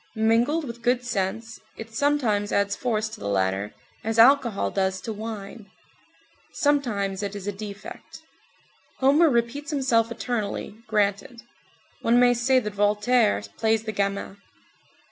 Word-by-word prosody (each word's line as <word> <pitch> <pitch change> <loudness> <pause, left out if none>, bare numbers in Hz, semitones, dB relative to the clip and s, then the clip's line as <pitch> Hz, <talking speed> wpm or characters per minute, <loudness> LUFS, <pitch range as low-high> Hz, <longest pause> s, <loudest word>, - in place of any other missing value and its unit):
Mingled 235 +8 +2
with 235 -2 -8
good 245 +1 +1
sense, 225 +1 -3 0.2
it 225 0 -9
sometimes 225 -6 +1
adds 200 0 +1
force 220 -4 -1
to - - -10
the 100 - -5
latter, 95 +1 0 0.3
as 225 +1 -2
alcohol 235 -3 +4
does 190 -1 0
to 225 - -5
wine. 210 -1 -7 0.8
Sometimes 215 -10 0
it 200 0 -4
is 200 -2 -7
a 205 - -1
defect. 205 0 -9 0.8
Homer 290 +5 +4
repeats 240 +4 -1
himself 245 -6 +1
eternally, 235 -4 -3
granted; 210 +3 -1 0.6
one 235 +1 +3
may 245 0 +5
say 245 +2 +2
that 210 -5 -1
Voltaire 205 - +2 0.2
plays 220 -1 +2
the 220 - -3
gamin. 200 0 -2
225 Hz, 135 wpm, -25 LUFS, 200-245 Hz, 0.8 s, may